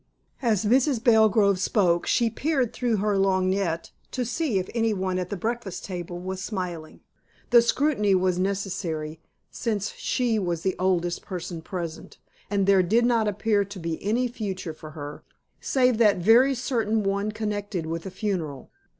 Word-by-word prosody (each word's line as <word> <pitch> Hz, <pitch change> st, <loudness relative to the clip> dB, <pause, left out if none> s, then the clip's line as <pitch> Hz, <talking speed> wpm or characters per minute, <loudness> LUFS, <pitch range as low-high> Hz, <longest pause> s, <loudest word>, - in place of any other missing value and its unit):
As 220 Hz, -5 st, +1 dB
Mrs. 255 Hz, +1 st, +2 dB
Belgrove 220 Hz, -4 st, +4 dB
spoke 180 Hz, -4 st, +2 dB
she 235 Hz, -2 st, +2 dB
peered 265 Hz, -2 st, 0 dB
through 240 Hz, -3 st, 0 dB
her 205 Hz, 0 st, +1 dB
lorgnette 185 Hz, -3 st, 0 dB, 0.2 s
to 250 Hz, -1 st, -2 dB
see 250 Hz, -2 st, -1 dB
if 185 Hz, -, -1 dB
anyone 195 Hz, -5 st, 0 dB
at 180 Hz, -1 st, -4 dB
the 205 Hz, -, -3 dB
breakfast 225 Hz, -2 st, -4 dB
table 175 Hz, -2 st, -5 dB
was 185 Hz, +1 st, -5 dB
smiling. 180 Hz, -6 st, -5 dB, 0.5 s
The 240 Hz, -1 st, +8 dB
scrutiny 235 Hz, -5 st, +2 dB
was 185 Hz, -1 st, +1 dB
necessary, 180 Hz, -5 st, -3 dB, 0.3 s
since 215 Hz, -3 st, -2 dB
she 235 Hz, -3 st, 0 dB
was 175 Hz, -4 st, -2 dB
the 190 Hz, -, 0 dB
oldest 175 Hz, -2 st, 0 dB
person 175 Hz, -2 st, -6 dB
present, 170 Hz, -1 st, -6 dB, 0.3 s
and 200 Hz, -1 st, +1 dB
there 195 Hz, -1 st, +5 dB
did 220 Hz, +7 st, +2 dB
not 230 Hz, -3 st, +2 dB
appear 205 Hz, 0 st, +1 dB
to 200 Hz, +1 st, -10 dB
be 165 Hz, -1 st, -4 dB
any 235 Hz, +5 st, +1 dB
future 195 Hz, -8 st, -5 dB
for 155 Hz, 0 st, -11 dB
her, 145 Hz, 0 st, -7 dB, 0.4 s
save 250 Hz, -3 st, +2 dB
that 210 Hz, -4 st, +5 dB
very 235 Hz, +9 st, +5 dB
certain 225 Hz, -4 st, 0 dB
one 200 Hz, +2 st, 0 dB
connected 205 Hz, -4 st, -3 dB
with 165 Hz, +2 st, -4 dB
a -, -, -4 dB
funeral. 180 Hz, -, -4 dB
200 Hz, 160 wpm, -25 LUFS, 180-225 Hz, 0.5 s, The